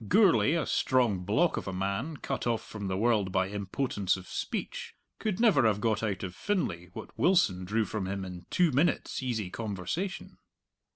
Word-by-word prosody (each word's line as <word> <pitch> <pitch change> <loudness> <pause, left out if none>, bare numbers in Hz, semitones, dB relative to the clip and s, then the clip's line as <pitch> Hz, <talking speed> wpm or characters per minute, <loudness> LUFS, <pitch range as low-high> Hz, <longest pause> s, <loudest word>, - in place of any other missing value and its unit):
Gourlay, 180 - +5
a 165 - 0
strong 120 -7 +2
block 105 - +1
of - - -4
a - - -2
man 100 - -2
cut - - -3
off 115 -2 0
from 105 -2 -5
the 95 0 -1
world 105 -3 +2
by 95 0 +1
impotence 100 0 -1
of 95 - -11
speech, - - -4 0.2
could 215 -3 -1
never 190 - +5
have 105 -2 +1
got 110 -1 +1
out 100 -4 -2
of 90 -2 -4
Finlay 95 - -2
what - - -9
Wilson 115 - +3
drew 110 +3 +1
from 105 -3 -3
him 95 0 -3
in 90 -1 -9
two 175 -3 +3
minutes' 145 +1 +1
easy 110 -7 -2
conversation. 110 - -4
105 Hz, 180 wpm, -30 LUFS, 95-140 Hz, 0.2 s, Gourlay